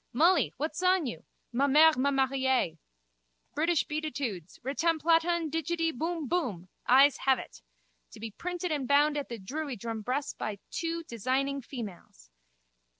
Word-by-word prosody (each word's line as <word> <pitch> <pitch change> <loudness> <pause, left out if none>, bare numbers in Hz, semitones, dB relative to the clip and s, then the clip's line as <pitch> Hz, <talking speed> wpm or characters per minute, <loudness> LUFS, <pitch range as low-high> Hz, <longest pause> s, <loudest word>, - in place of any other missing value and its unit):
Mullee! 340 +8 +4
What's 305 +4 -3
on 365 -2 +3
you? 240 - -6 0.3
Ma 275 +4 +2
mère 310 +3 +6
m'a 260 +3 +2
mariée. 265 - +1 0.7
British 325 +1 +2
Beatitudes! 285 - -4
Retamplatan 330 +3 +1
digidi 325 +1 0
boumboum. 310 - -2 0.2
Ayes 270 +3 +6
have 265 -1 +3
it. - - -10 0.5
To - - -13
be 225 0 -6
printed 355 - -4
and 285 -4 -1
bound 290 +2 +4
at 290 -1 -3
the 235 - -5
Druiddrum 230 -1 -5
press 270 +6 -2
by 215 -2 -4
two 335 0 -3
designing 270 +3 -1
females. 215 - -9
280 Hz, 135 wpm, -29 LUFS, 250-325 Hz, 0.7 s, mère